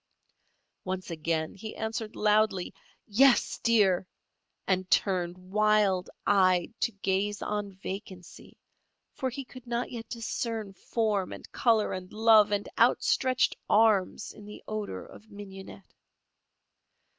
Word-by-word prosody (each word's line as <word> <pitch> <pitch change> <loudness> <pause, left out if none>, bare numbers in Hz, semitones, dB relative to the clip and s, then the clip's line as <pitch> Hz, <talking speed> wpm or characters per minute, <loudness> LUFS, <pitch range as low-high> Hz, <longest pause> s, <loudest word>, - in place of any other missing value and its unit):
Once 185 -1 -4
again 160 0 -2
he 215 +2 -8
answered 220 0 -4
loudly: 210 -3 +2 0.3
"Yes, 250 +5 +3
dear!" 195 -6 +3 0.6
and 185 -1 0
turned, 180 -3 +1
wild 195 0 +2 0.2
eyed, 185 -1 +3
to 230 - +1
gaze 200 +1 -1
on 205 -1 -3
vacancy, 190 -2 -9 0.6
for 260 - -2
he 265 +2 -6
could 255 -1 -13
not 240 +1 -2
yet 230 -2 -7
discern 225 -3 -4
form 210 -2 -1
and - - -10
colour 225 -3 +2
and 185 0 -7
love 215 -1 +5
and 205 0 -1
outstretched 255 -2 +3
arms 210 -2 +3
in 210 - -13
the 210 - -11
odour 210 - -4
of 220 - -15
mignonette. 195 -2 -11
205 Hz, 120 wpm, -28 LUFS, 190-220 Hz, 0.6 s, love